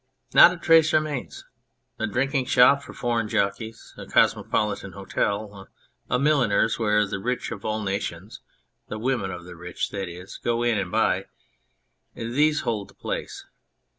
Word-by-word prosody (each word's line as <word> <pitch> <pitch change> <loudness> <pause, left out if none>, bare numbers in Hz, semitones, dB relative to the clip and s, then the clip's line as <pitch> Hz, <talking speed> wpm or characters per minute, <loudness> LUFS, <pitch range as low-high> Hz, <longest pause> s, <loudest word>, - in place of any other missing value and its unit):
Not - - +9
a 180 - -6
trace 165 -1 +4
remains. 155 -4 -2 0.5
A 110 - 0
drinking 130 +4 0
shop 135 +3 +5
for - - -11
foreign 115 -3 -1
jockeys, 110 +4 -2
a - - -8
cosmopolitan 100 -3 +1
hotel, 100 +1 -3 0.4
a 125 - +2
milliner's 125 -7 +2
where 105 -1 +2
the 100 0 -4
rich 125 +4 -3
of 105 -4 -7
all 110 0 -2
nations 95 -1 -4 0.5
(the 105 - -5
women 115 -4 -1
of 90 -2 -7
the 90 0 -10
rich, 90 +1 -5
that 95 -3 -4
is) 90 +2 -10
go 120 0 0
in 120 -3 +2
and 95 -2 -4
buy; - - +1 0.9
these 145 +7 +1
hold 105 -4 -2
the - - -20
place. - - -5
110 Hz, 155 wpm, -25 LUFS, 100-125 Hz, 0.9 s, Not